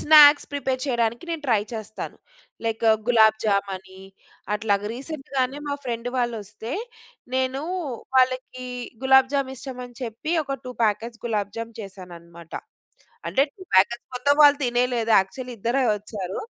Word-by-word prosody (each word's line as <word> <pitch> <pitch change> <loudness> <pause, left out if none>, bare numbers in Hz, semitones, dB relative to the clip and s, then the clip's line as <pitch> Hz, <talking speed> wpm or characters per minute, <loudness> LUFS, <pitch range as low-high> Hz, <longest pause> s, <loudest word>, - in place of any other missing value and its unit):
Snacks 295 -1 +8
prepare 265 -2 -1
చెయడానికి 235 +1 0
నేను 325 -2 -3
try 225 -4 +4
చేస్తాను. 220 -1 -6 0.5
Like 225 0 -1 0.2
'gulab 220 -3 +6
జామనీ' 190 -2 -2 0.5
అట్లాగా. 205 -1 0
రీసెంట్‌గానే 275 -1 -3
మా 285 - 0
ఫ్రెండ్ 235 0 -3
వాళ్ళొస్తే, 225 -2 -3 0.6
నేనూ 260 +2 0 0.5
వాళ్ళకీ 255 0 +1 0.4
గులాబ్ 265 0 +6
జామిష్టమని 260 -2 -4
చెప్పి, 240 +8 -4
ఒక 275 -1 -3
2 250 - -6
ప్యాకెట్స్ 225 +2 0
'గులాబ్ 210 -3 -1
జామ్' 230 0 -6
చేశాననమాట. 170 -4 -11 0.8
అంటే, 270 - +3
2 380 - -13
ప్యాకెట్స్ 235 +6 +4
మొత్తం 285 +3 +3
వాళ్ళు 290 0 +7
తినేయలేదు. 240 -2 +1
యాక్చుల్లీ 245 +6 -3
ఇద్దరే 250 +5 +1
ఒచ్చారు. 200 -3 -5
240 Hz, 125 wpm, -24 LUFS, 210-265 Hz, 0.8 s, Snacks